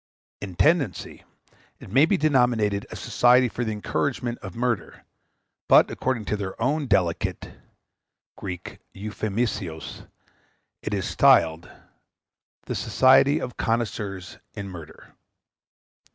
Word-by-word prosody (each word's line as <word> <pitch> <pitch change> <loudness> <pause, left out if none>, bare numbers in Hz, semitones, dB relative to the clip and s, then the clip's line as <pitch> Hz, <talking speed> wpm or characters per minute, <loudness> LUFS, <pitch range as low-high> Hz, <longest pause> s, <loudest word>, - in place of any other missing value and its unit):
In 95 -3 -7
tendency, 145 - 0 0.5
it - - -12
may 135 +7 +5
be 200 - +2
denominated 120 - +1
a - - -8
Society 125 +1 +3
for 120 +1 -4
the 110 - -2
Encouragement 120 +3 -2
of 95 - -9
Murder; 120 -5 -2 0.7
but, - - +6
according 120 -5 -2
to 105 - -1
their 100 -1 -6
own 140 +5 0
delicate 85 -7 0 0.8
[Greek: 90 -2 -7 0.2
euphaemismos], 105 -4 -4 0.7
it 105 - -3
is 100 -1 -2
styled 85 -11 +3 0.9
The - - -5
Society 135 +2 +4
of 125 - -6
Connoisseurs 105 -5 -3 0.2
in 100 -1 -6
Murder. 85 -4 -12
110 Hz, 110 wpm, -24 LUFS, 95-125 Hz, 0.9 s, but